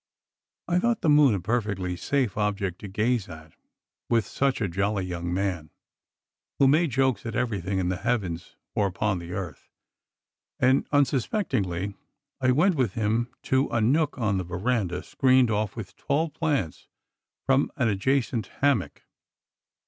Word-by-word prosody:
I 175 0 +2
thought 235 +2 +1
the 160 - +2
moon 145 -6 +6
a - - -1
perfectly 100 -3 -1
safe 125 +4 -1
object 100 -3 -1
to 105 - -7
gaze 110 +1 0
at 80 -2 -11 0.6
with 115 -3 +2
such 135 +6 0
a 105 - 0
jolly 95 +2 -1
young 85 -1 -4
man, 90 -4 -2 0.9
who 135 - +5
made 155 +4 +4
jokes 130 -4 +1
at 115 -2 -5
everything 100 -6 -1
in 90 -1 0
the 90 - -1
heavens 90 -6 -2 0.2
or 100 - +2
upon 95 0 -1
the 85 +1 -8
earth; 90 -7 -6 0.9
and 130 +2 +3
unsuspectingly 125 - 0 0.5
I 130 - +3
went 160 +10 +4
with 130 - 0
him 115 +2 0
to 130 +2 +1
a 120 - 0
nook 140 +9 +2
on 105 -5 0
the - - -2
veranda 90 0 -1
screened 130 -3 +3
off 105 -1 -1
with 110 -5 -8
tall 155 +3 0
plants 145 - -2 0.6
from 135 +1 +2
an 125 - +1
adjacent 115 +2 0
hammock. 140 -9 0
110 Hz, 150 wpm, -26 LUFS, 95-130 Hz, 0.9 s, moon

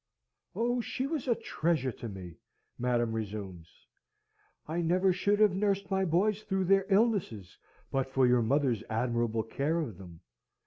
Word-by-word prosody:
"Oh, 240 +1 0
she 255 +3 -3
was 295 -2 -3
a 240 - +3
treasure 155 -9 -1
to 115 0 -8
me!" 90 -4 -9 0.4
Madam 120 -2 +1
resumes. 100 -6 -5 1.0
"I 165 +3 -1
never 180 +3 +2
should 200 +3 +1
have 210 -3 +5
nursed 195 -1 0
my 190 0 +2
boys 195 +5 +1
through 190 -2 -1
their 195 +1 +3
illnesses 195 - +1 0.4
but 135 -1 0
for 130 -1 +3
your 125 -1 +4
mother's 125 -2 +1
admirable 115 -1 0
care 145 +9 -1
of 115 - -5
them. 85 -3 -12
145 Hz, 150 wpm, -30 LUFS, -, 1.0 s, have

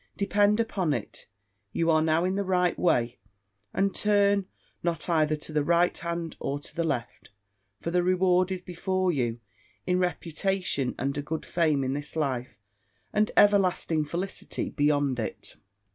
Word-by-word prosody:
Depend 205 +1 +3
upon 190 -9 0
it, 115 - -6 0.5
you 165 0 +2
are 155 0 +4
now 160 +2 +2
in 185 - 0
the 200 +1 0
right 180 -2 +1
way, 120 -8 +1 0.5
and 195 0 +1
turn 200 -2 +2 0.3
not 170 -1 -1
either 155 -3 +2
to 155 +1 -7
the 150 -1 +2
right 170 +3 +3
hand 170 -1 -4
or 140 - -2
to 145 - -12
the 170 - 0
left; 120 -7 -3 0.5
for 170 - -3
the 180 +1 +3
reward 185 0 +2
is 185 -1 -4
before 185 +1 -1
you, 120 -6 -1 0.5
in 180 0 +1
reputation 180 -4 -1
and 140 +2 -2
a - - -1
good 155 +2 -4
fame 155 -5 +1
in 130 0 -1
this 145 +2 -5
life, 130 -8 -2 0.6
and 210 +1 +2
everlasting 185 -6 +4
felicity 175 +6 -4
beyond 145 -3 +1
it. 110 - -5
170 Hz, 160 wpm, -27 LUFS, 145-185 Hz, 0.6 s, are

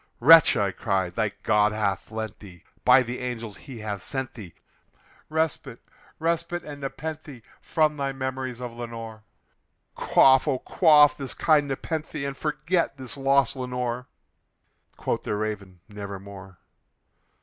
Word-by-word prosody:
"Wretch," 160 +3 +8
I 100 -2 +1
cried, 95 -2 -1
"thy 110 +1 0
God 105 -1 +3
hath 100 -3 -2
lent 110 -1 -5
thee 90 -4 -14 0.2
by 125 +1 +6
these 125 +1 -6
angels 115 -4 -5
he 135 -4 -11
hath 105 -3 -5
sent 130 +3 -4
thee 100 -8 -11 0.7
Respite 155 -5 -2 0.4
respite 170 +1 -2
aad 145 -1 -8
nepenthé 145 -2 -6 0.2
from 155 -1 +1
thy 140 -1 -1
memories 130 -2 -4
of 125 -2 -6
Lenore! 115 -2 -8 0.7
Quaff, 135 +2 +4
oh 135 -3 +1
quaff 150 -1 +5
this 135 -3 -6
kind 150 -3 +3
nepenthé, 150 +1 -4
and 140 -1 -4
forget 160 +3 -1
this 130 -2 -6
lost 135 -1 +2
Lenore!" 125 -1 -3 0.9
Quoth - - -2
the - - -3
Raven, 100 -4 -5
"Nevermore." 100 -2 -9
125 Hz, 135 wpm, -25 LUFS, 105-145 Hz, 0.9 s, Wretch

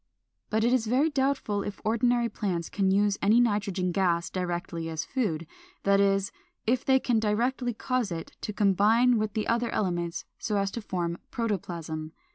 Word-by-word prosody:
But 220 +1 +1
it 240 +2 +3
is 235 -4 +1
very 270 +7 +2
doubtful 270 -7 0
if 205 0 -5
ordinary 235 +2 +2
plants 185 -6 -3
can 195 -2 +1
use 200 +1 +2
any 215 +4 +5
nitrogen 200 -5 +1
gas 175 -2 +1
directly 175 -2 -3
as 160 -1 -3
food; 190 - -1 0.4
that 200 0 +4
is, 195 0 +2 0.3
if 240 +3 +1
they 265 0 +4
can 240 -3 +1
directly 240 +3 0
cause 250 -4 -1
it 165 -1 -6
to - - -3
combine 215 +4 +4
with 215 -1 -1
the 215 0 -1
other 235 0 +1
elements 175 -4 -2
so 210 -2 -1
as 200 0 0
to 235 - -5
form 175 -4 -3
protoplasm. 165 -8 -3
205 Hz, 170 wpm, -28 LUFS, 180-235 Hz, 0.4 s, any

